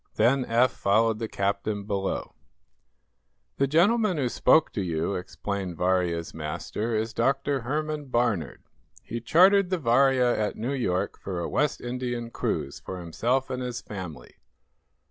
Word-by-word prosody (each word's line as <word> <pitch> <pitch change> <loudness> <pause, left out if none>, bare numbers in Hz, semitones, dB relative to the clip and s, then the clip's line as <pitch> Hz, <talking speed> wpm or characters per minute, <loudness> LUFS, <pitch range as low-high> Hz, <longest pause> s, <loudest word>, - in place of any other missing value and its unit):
Then 125 +4 +3
Eph 120 +2 +3
followed 110 +2 +2
the 115 - -2
captain 100 +1 -2
below. 100 -1 -3 1.2
"The 140 - +2
gentleman 190 - +3
who 130 -4 0
spoke 155 +6 +3
to 105 - -2
you," 85 +1 -1
explained 95 -1 -4
Varia's 90 -2 0
master, 80 +8 -3
"is 110 +1 -1
Dr. 135 +3 +1
Herman 150 +4 -2
Barnard. 120 -8 -1 0.4
He 115 - -5
chartered 185 - +5
the 185 - +1
'Varia' 130 -2 +3
at 105 -1 -1
New 120 +5 -3
York 100 -7 -1
for 95 -3 -4
a 85 - -2
West 150 0 0
Indian 120 -1 -4
cruise - - -3
for 95 - -6
himself 120 +11 -1
and 130 0 -3
his 125 -1 -3
family. 85 - -8
115 Hz, 145 wpm, -26 LUFS, 100-135 Hz, 1.2 s, chartered